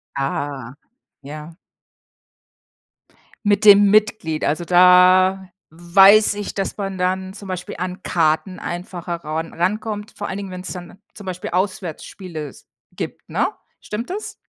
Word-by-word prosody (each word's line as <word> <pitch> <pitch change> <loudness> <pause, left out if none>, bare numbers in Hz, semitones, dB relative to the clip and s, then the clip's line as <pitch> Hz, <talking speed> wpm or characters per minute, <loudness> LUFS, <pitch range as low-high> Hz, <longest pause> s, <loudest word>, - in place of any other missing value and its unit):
Ah, 135 -2 -3 0.5
ja. 150 +3 -9 1.9
Mit 205 +1 +2
dem 205 -1 +8
Mitglied, 210 -7 +1
also 155 +3 0
da 185 +2 +5 0.2
weiß 195 +6 +5
ich, 205 -1 -5
dass 195 -1 -3
man 195 -2 -4
dann 185 +1 -1
zum 200 -1 -10
Beispiel 180 -1 -5
an 180 +1 -5
Karten 170 +2 0
einfacher 175 -1 -5
ran 160 0 -4
ran - - -17
rankommt, 210 +3 -2
vor 205 - -5
allen 195 - -4
Dingen, 195 -2 -6
wenn's 185 0 -7
dann 180 +2 -10
zum 205 - -12
Beispiel 185 +2 -5
Auswärtsspiele 180 -3 -4
s - - -16 0.3
gibt, - - -6
ne? - - 0 0.3
Stimmt 220 +7 -5
das? 420 +3 -5
185 Hz, 135 wpm, -20 LUFS, 170-200 Hz, 1.9 s, dem